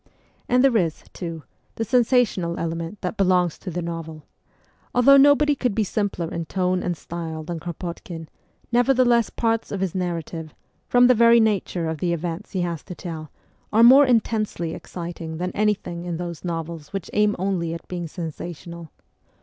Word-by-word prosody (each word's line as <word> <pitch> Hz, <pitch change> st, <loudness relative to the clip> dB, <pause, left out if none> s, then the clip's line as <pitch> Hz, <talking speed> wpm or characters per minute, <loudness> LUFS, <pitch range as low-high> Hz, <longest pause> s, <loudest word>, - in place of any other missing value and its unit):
And 250 Hz, +1 st, +4 dB
there 265 Hz, -4 st, +5 dB
is, 165 Hz, -6 st, -1 dB
too, 165 Hz, -3 st, -6 dB, 0.3 s
the 225 Hz, -, -2 dB
sensational 230 Hz, -7 st, +2 dB
element 165 Hz, +3 st, -4 dB
that 180 Hz, +4 st, -3 dB
belongs 180 Hz, -3 st, +2 dB
to 190 Hz, -, -6 dB
the 175 Hz, 0 st, -3 dB
novel. 165 Hz, -2 st, -6 dB, 0.7 s
Although 275 Hz, +3 st, +7 dB
nobody 290 Hz, +1 st, +6 dB
could 250 Hz, -6 st, -1 dB
be 220 Hz, -, +2 dB
simpler 195 Hz, -5 st, -2 dB
in 165 Hz, 0 st, -3 dB
tone 185 Hz, 0 st, 0 dB
and 175 Hz, -2 st, -2 dB
style 160 Hz, -2 st, -6 dB
than 170 Hz, +1 st, -5 dB
Kropotkin, 170 Hz, -1 st, -6 dB, 0.4 s
nevertheless 245 Hz, -1 st, +3 dB
parts 225 Hz, -1 st, -1 dB
of 200 Hz, -, -3 dB
his 190 Hz, -3 st, -1 dB
narrative, 165 Hz, -3 st, -4 dB, 0.3 s
from 245 Hz, 0 st, +5 dB
the 255 Hz, -, +7 dB
very 235 Hz, 0 st, +6 dB
nature 200 Hz, -6 st, +1 dB
of 160 Hz, -1 st, -3 dB
the 175 Hz, +1 st, 0 dB
events 170 Hz, 0 st, -5 dB
he 185 Hz, -, 0 dB
has 170 Hz, -3 st, -2 dB
to 180 Hz, -, -8 dB
tell, 160 Hz, -4 st, -7 dB, 0.4 s
are 225 Hz, +2 st, +5 dB
more 265 Hz, +4 st, +8 dB
intensely 215 Hz, -8 st, 0 dB
exciting 170 Hz, -2 st, -7 dB
than 180 Hz, +2 st, -2 dB
anything 200 Hz, -5 st, -1 dB
in 175 Hz, -2 st, -3 dB
those 170 Hz, -2 st, -6 dB
novels 165 Hz, -3 st, -5 dB
which 195 Hz, -3 st, -5 dB
aim 210 Hz, 0 st, +3 dB
only 180 Hz, -3 st, -1 dB
at 165 Hz, -, -10 dB
being 175 Hz, -2 st, -4 dB
sensational. 170 Hz, 0 st, -7 dB
180 Hz, 165 wpm, -23 LUFS, 165-220 Hz, 0.7 s, more